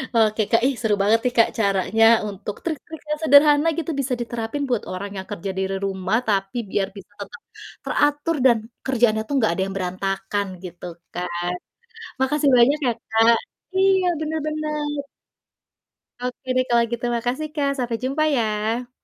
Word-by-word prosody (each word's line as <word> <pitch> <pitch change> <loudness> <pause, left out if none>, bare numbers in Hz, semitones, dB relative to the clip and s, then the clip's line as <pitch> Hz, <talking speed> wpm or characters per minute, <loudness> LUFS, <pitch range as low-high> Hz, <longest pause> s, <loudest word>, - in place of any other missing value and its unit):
Oke, 220 -1 +3
Kak. 230 - +4
Ih, 275 - 0
seru 215 -3 +2
banget 215 +3 +4
nih 250 - 0
Kak 230 - +6
caranya 200 +2 +2 0.3
untuk 200 +1 -6
trik-trik 320 -1 -5
yang 300 - -1
sederhana 295 +1 +6
gitu, 335 0 -2
bisa 260 -1 -1
diterapin 235 +4 -3
buat 240 -4 0
orang 195 +2 -5
yang 190 - -6
kerja 195 +3 -4
di - - 0
re 195 - -1
rumah 190 +2 0
tapi 195 +2 0
biar 195 -1 +1
bisa 195 - -12
tetap 480 - -9 0.4
teratur 295 +3 +1
dan 240 -3 +6 0.3
kerjaannya 235 -4 +2
tuh - - -4
nggak 220 -7 +2
ada 190 - -2
yang 195 - -6
berantakan 195 +2 -2 0.2
gitu 175 0 -9 0.3
kan. 175 0 -3 0.7
Makasih 285 +2 +2
banyak 270 +5 +5
ya - - +3 0.2
Kak, 225 +1 +5 0.4
iya, 380 -1 +4
bener 315 0 -2
bener. 300 -2 -3 1.2
Oke, 250 +1 -5
deh, 255 0 +2
kalau 235 -1 +3
gitu. 235 +1 -3
Makasih, 250 +6 -2
Kak, 285 -2 +1
sampai 240 -2 -1
jumpa, 275 +4 0
ya. 225 +2 -1
235 Hz, 165 wpm, -22 LUFS, 200-290 Hz, 1.2 s, Kak